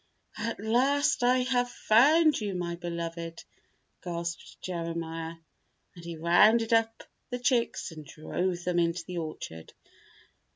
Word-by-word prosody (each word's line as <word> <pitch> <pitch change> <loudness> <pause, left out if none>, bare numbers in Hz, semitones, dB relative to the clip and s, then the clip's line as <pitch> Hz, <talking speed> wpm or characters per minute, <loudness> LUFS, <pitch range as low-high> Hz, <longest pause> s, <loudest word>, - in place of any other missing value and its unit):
"At 230 - -3
last 255 +7 +2
I 250 +1 +4
have 245 -1 +1
found 295 +8 +4
you, 200 -3 -2
my 175 -1 -2
beloved," 170 -1 -5 0.6
gasped 170 -1 -5
Jeremiah, 165 -2 -4 0.6
and 170 - -12
he 170 -1 -6
rounded 215 +8 +4
up 225 0 +2 0.3
the 245 - -2
chicks 245 -5 0
and 155 -1 -9
drove 175 +4 -3
them 180 -1 +1
into 170 0 0
the 180 -1 -4
orchard. 155 - -7
180 Hz, 125 wpm, -29 LUFS, 170-235 Hz, 0.6 s, I